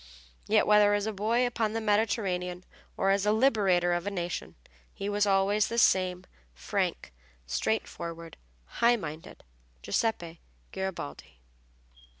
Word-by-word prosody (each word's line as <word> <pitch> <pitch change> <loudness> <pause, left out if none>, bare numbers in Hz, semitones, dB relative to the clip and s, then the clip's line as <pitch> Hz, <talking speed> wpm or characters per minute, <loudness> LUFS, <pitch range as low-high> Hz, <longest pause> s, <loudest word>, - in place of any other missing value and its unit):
Yet - - +3
whether 210 -1 +5
as 205 0 -1
a 220 - -2
boy 225 +5 +1
upon 225 -3 -1
the 225 - -1
Mediterranean 200 -4 -1 0.3
or 195 - +2
as 200 0 +2
the 210 - +3
liberator 200 -7 +3
of 175 +2 -2
a - - +2
nation 175 -3 -4 0.4
he 200 - -6
was 205 0 +1
always 200 +2 +2
the 235 - -4
same 185 -4 +2 0.3
frank, - - -3 0.3
straightforward, 170 - -3 0.3
high 235 - +2
minded 160 -7 -8 0.4
Giuseppe 170 - -2 0.3
Garibaldi. 175 - -6
200 Hz, 130 wpm, -28 LUFS, 175-215 Hz, 0.4 s, whether